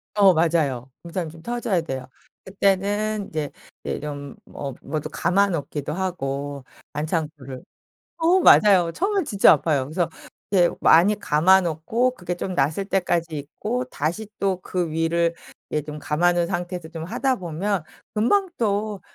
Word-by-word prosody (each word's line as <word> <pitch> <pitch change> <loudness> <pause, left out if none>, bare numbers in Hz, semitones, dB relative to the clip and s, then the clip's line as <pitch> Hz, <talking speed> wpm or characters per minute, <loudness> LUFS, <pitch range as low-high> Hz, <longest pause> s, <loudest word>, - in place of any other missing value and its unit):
어 195 -3 +6
맞아요. 150 -6 +1
굳은살이 170 -1 -4
좀 160 +1 -13
터져야 235 -5 -1
돼요. 130 -5 -5 0.4
그때는 200 +2 0
이제 155 -2 -3 0.3
이제 - - -3
좀 145 -2 -6 0.2
어 140 -2 -5
뭐도 155 -2 -4
감아 195 +4 +2
놓기도 150 -3 -3
하고 145 -7 -3 0.3
반창고를. 150 -4 -4 0.5
어 340 +3 +4
맞아요. 190 - +6
처음엔 390 - 0
진짜 200 -6 +5
아파요. 145 -5 +1
그래서 165 +4 -1 0.4
이렇게 175 -3 +3
많이 200 +6 +6
감아 185 +6 +4
놓고 180 +10 0
그게 175 -1 -4
좀 185 +1 -4
나았을 155 +6 0
때까지 170 -5 0
있고 225 - -3
다시 200 - -3
또 190 -2 0
그 175 -4 -2
위를 165 +1 +1 0.4
이제 150 - 0
좀 150 +1 -8
감아 170 +4 +1
놓은 175 -1 +1
상태에서 175 -2 -4
좀 165 -1 -6
하다 255 +5 0
보면 180 +1 -2 0.3
금방 365 - +2
또 210 -3 -1
175 Hz, 300 characters per minute, -23 LUFS, 155-200 Hz, 0.5 s, 어